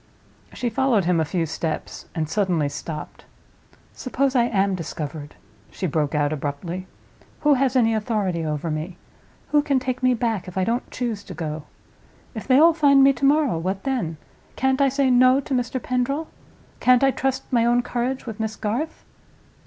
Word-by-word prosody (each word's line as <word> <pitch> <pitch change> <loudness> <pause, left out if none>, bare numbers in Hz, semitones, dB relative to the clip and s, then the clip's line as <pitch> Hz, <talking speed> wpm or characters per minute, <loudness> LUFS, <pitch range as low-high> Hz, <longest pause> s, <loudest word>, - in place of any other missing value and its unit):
She 240 -2 -2
followed 235 -5 +2
him 175 -1 +2
a 160 - +1
few 170 +1 -1
steps, 160 0 -4
and 160 -2 -1
suddenly 175 -4 +1
stopped. 150 +1 -7 0.7
"Suppose 265 +1 -1
I 240 -2 +4
am 200 -4 +1
discovered?" 155 -3 -6 0.3
she - - -5
broke 150 -2 0
out, 145 0 +1
abruptly. 155 +6 -4 0.5
"Who 295 -1 +5
has 265 -1 +1
any 225 -3 +4
authority 210 -6 -1
over 155 +1 -2
me? 160 +4 -4 0.5
Who 295 - +5
can 285 -2 +1
take 255 0 -2
me 255 -1 +3
back, 225 -6 -2
if 180 - -8
I 190 - +2
don't 235 +6 -1
choose 230 -5 -3
to 180 - -9
go? 155 -2 -5 0.7
If 220 - -7
they 260 0 +5
all 330 +3 +7
find 280 -4 +5
me 275 0 +6
to 275 - -2
morrow, 280 - +3
what 190 +3 -3
then? 230 - -2 0.4
Can't 265 +1 +1
I 275 - +5
say 270 -1 +1
No 255 +2 +5
to 275 - -5
Mr. 250 0 -1
Pendril? 260 +6 -1 0.5
Can't 250 +1 +4
I 270 - +5
trust 265 0 -3
my 235 -2 +4
own 240 +1 +3
courage 245 +2 -2
with 225 -2 -7
Miss 220 0 -2
Garth?" 235 +9 -3
230 Hz, 180 wpm, -23 LUFS, 170-260 Hz, 0.7 s, all